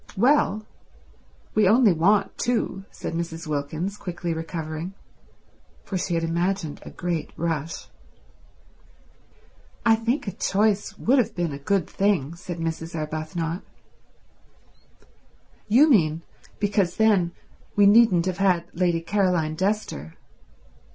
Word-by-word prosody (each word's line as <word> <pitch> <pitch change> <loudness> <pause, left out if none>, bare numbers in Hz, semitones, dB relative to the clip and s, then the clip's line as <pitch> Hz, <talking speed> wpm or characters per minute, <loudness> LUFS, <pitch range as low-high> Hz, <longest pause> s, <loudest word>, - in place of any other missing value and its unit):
"Well, 220 -3 +3 0.9
we 215 -3 +4
only 220 -1 +5
want 190 +6 +2
two," 225 -5 -1
said - - -6
Mrs. 165 0 -4
Wilkins, 155 +6 -3
quickly 175 -3 -4
recovering, 160 +2 -5 0.9
for 195 - -6
she 180 -1 -1
had 165 - 0
imagined 170 0 -1
a - - -9
great 170 -3 -3
rush. 165 -1 -3 2.0
"I 225 - +6
think 230 +3 -1
a - - -1
choice 205 +2 0
would 260 +4 +3
have 240 - 0
been 175 -3 -1
a 140 - -6
good 180 +3 0
thing," 190 -7 0
said 175 0 -7
Mrs. 165 0 -4
Arbuthnot. 155 +2 -3 2.1
"You 250 +9 +6
mean 165 - +3 0.3
because 200 -3 0
then 200 -6 +3 0.4
we 205 - +5
needn't 200 -4 +6
have 185 0 -2
had 185 -3 +3
Lady 175 -1 +1
Caroline 175 -3 +1
Dester." 185 - -2
180 Hz, 115 wpm, -24 LUFS, 165-205 Hz, 2.1 s, I